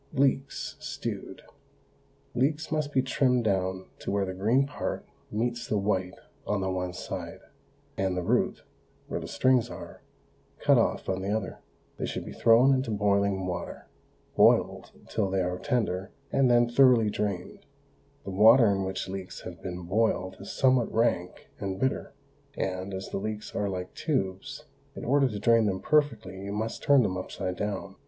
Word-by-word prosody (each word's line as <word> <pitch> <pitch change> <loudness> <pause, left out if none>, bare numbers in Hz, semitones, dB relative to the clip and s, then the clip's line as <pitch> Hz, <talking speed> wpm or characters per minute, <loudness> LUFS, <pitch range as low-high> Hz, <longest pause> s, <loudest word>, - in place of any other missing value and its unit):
LEEKS, 135 0 0
STEWED. - - -6 0.9
Leeks 145 +5 0
must 155 -2 -1
be 130 -2 +2
trimmed 130 -2 +2
down 95 -2 0
to - - -5
where 100 0 +1
the 95 - -4
green 115 +9 +2
part 145 - -4 0.2
meets 120 +2 -2
the 105 - 0
white 95 -2 -1 0.3
on 105 - 0
the 95 0 -1
one 90 -1 -2
side, 90 - -6 0.6
and 95 -1 0
the 90 - -1
root, - - +1 0.4
where - - -3
the - - -7
strings 125 0 +2
are, 85 -6 -9 0.6
cut - - +4
off - - +1
on 95 0 -1
the 95 - -3
other. 105 -2 -2 0.4
They - - -2
should - - -4
be - - -7
thrown 120 +4 +5
into 130 -2 0
boiling 100 -2 +1
water, 90 -1 -5 0.5
boiled - - +3 0.2
till 95 - -1
they 95 0 +1
are 90 0 -2
tender, 105 -8 -1 0.2
and 135 -2 +3
then 120 0 +5
thoroughly 120 -3 +5
drained. 100 -3 -4 0.6
The 95 - -6
water 110 +3 +7
in 95 -1 0
which 95 0 -3
leeks 95 -1 -6
have 85 -2 -9
been 90 -1 -5
boiled 95 0 0
is 100 - -7
somewhat 130 -3 +3
rank 110 -6 0
and 95 -1 -3
bitter, 130 0 -1 0.4
and, 95 +1 -2
as 95 0 -5
the - - -3
leeks 110 +1 -5
are 100 -1 -1
like 90 -1 -5
tubes, 95 - -3 0.3
in - - -7
order 140 +2 +4
to 105 -4 -4
drain 115 +1 +4
them 95 -2 -1
perfectly 115 -10 +1
you 100 0 -5
must 110 +2 -3
turn 140 -3 +5
them 95 -3 -1
upside 90 0 -4
down. 100 -1 -4
105 Hz, 170 wpm, -28 LUFS, 95-120 Hz, 0.9 s, water